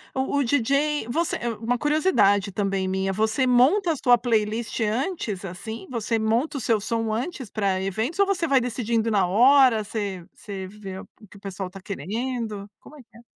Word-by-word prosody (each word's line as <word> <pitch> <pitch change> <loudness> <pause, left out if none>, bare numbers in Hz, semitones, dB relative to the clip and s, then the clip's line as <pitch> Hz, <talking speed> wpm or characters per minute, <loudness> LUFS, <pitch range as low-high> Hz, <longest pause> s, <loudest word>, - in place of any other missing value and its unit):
o 265 +2 0
o 285 - +3
DJ, 280 +2 +1
você, 330 +7 0 0.2
uma 240 +2 0
curiosidade 235 - +2
também 195 -1 -1
minha, 190 +1 -1
você 220 +6 +1
monta 280 +10 +4
a - - -4
sua 245 -3 +4
playlist 225 -1 -1
antes 220 - -2
assim? 195 +5 -7
Você 230 -1 -1
monta 230 +7 0
o - - -3
seu 225 -3 +1
som 225 0 -1
antes 255 - -4
pra 195 -3 0
eventos 220 - -2
ou 400 - +6
você 370 -4 0
vai 275 -3 +4
decidindo 230 -2 -1
na 195 -4 +2
hora, 245 +3 +5
você 200 -4 -4
você 195 -2 -7
vê 195 -1 -8
o - - -11 0.2
que 205 - -15
o - - -15
pessoal 195 -1 -5
está 190 +2 -11
querendo? 210 - -4
Como - - -15
é - - -12
que 235 - -30
é? - - -15
225 Hz, 190 wpm, -24 LUFS, 200-260 Hz, 0.2 s, ou